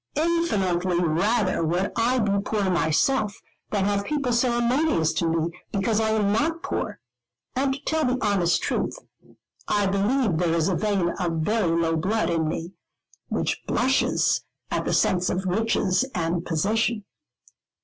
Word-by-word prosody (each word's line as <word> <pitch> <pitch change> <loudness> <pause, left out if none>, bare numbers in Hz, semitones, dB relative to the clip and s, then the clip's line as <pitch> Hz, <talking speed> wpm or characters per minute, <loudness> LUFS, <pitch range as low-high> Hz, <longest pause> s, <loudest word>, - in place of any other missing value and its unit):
Infinitely 200 - +1
rather 185 +5 +1
would 175 +5 0
I 240 +2 +2
be 200 -4 +1
poor 205 -3 0
myself, 200 - +1 0.3
than 200 -2 0
have 200 0 0
people 280 -1 -1
ceremonious 240 - +2
to 165 - 0
me 165 0 0 0.2
because 205 +2 0
I 220 0 +1
am 210 -2 +1
not 325 +8 0
poor; - - -3 0.6
and 265 +1 +1
to 280 - -12
tell 315 0 +1
the 250 0 +1
honest 200 -7 +1
truth, - - -1 0.7
I 205 -1 +1
believe 200 +1 +1
there 170 -2 +1
is 165 +2 +1
a 185 - +1
vein 200 -3 0
of 165 -3 -1
very 170 -3 +1
low 165 -1 +1
blood 200 +5 0
in 160 -2 0
me, 165 +2 -4 0.6
which - - -1
blushes 260 +2 +1 0.3
at - - -1
the - - 0
sense 180 -1 +2
of 185 +1 -2
riches 200 +1 +1
and 170 0 -1
position. 210 +7 0
200 Hz, 150 wpm, -24 LUFS, 175-235 Hz, 0.7 s, I